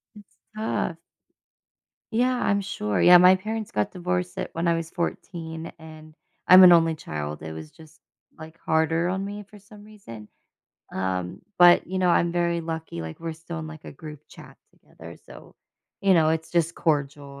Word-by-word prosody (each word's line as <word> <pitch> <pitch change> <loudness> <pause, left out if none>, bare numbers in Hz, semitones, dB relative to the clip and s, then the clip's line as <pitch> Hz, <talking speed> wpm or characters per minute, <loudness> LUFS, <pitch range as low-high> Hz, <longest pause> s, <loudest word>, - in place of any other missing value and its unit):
It's 205 -1 -17 0.2
tough. 215 -6 -2 1.2
Yeah, 250 +3 +1
I'm 200 0 +1
sure, 105 - -2
yeah, 180 0 +8
my 180 +1 +7
parents 215 +2 -5
got 105 0 -1
divorced 180 0 -3
at - - -4
when 165 +1 -2
I 170 - +3
was 165 -1 -4
14, 165 -2 -5
and 155 -1 -13 0.3
I'm 185 +1 +9
an 180 - +9
only 165 -1 +4
child, 75 - -6
it 80 - -7
was 80 -1 -9
just, 160 0 -18 0.4
like, 160 +1 -12
harder 160 +2 +1
on 190 +1 -2
me 205 +1 -7
for 210 - -14
some 205 +1 -16
reason, 115 - -12 0.6
um, 95 -1 -3 0.2
but, 175 0 +6
you 185 +1 -4
know, 180 -1 +2
I'm 170 0 +2
very 170 -1 0
lucky, 160 - -6
like, 80 -1 -8
we're 165 -1 -5
still 165 +1 -8
in, 155 - -7
like, 155 -1 -11
a - - -9
group 150 0 -11
chat - - -15
together, - - -14
so, - - -15 0.5
you 195 -1 +4
know, 160 -3 +4
it's 160 0 -2
just 170 -1 0
cordial 140 -3 -2
165 Hz, 180 wpm, -24 LUFS, 155-180 Hz, 1.2 s, I'm